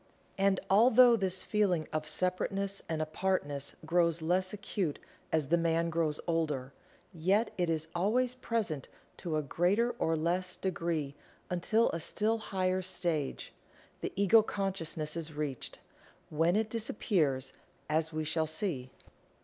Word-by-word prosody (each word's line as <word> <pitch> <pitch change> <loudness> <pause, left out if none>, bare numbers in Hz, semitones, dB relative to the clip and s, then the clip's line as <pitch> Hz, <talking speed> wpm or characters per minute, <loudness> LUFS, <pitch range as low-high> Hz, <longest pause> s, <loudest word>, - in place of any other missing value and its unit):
And, 195 -1 +3
although 240 +4 +7
this 190 -3 -1
feeling 185 -7 +1
of 155 0 -2
separateness 195 +3 -1
and 160 -1 0
apartness 155 -4 -2
grows 170 0 +2
less 180 +3 +1
acute 200 -6 -2 0.3
as 155 -4 +1
the 170 +1 +4
man 165 0 +1
grows 155 -2 0
older, 150 -6 -1 0.4
yet 190 +7 +2
it 175 -2 0
is 160 -1 -1
always 235 +8 +1
present 225 - -2 0.3
to 160 -3 -2
a 155 - 0
greater 190 - +2
or 160 - +2
less 180 +3 -1
degree 165 -6 -2 0.4
until 215 +6 +2
a 165 - -3
still 220 +7 0
higher 185 -3 0
stage 175 -6 -2 0.5
the - - -3
Ego 200 +3 +6
consciousness 185 -7 -3
is 165 -2 -3
reached, 145 -4 -4 0.5
when 165 +4 +2
it 220 0 0
disappears 170 - 0 0.3
as 155 +1 +1
we 155 0 -2
shall 160 +1 0
see. 155 - -2
175 Hz, 135 wpm, -32 LUFS, 155-195 Hz, 0.5 s, although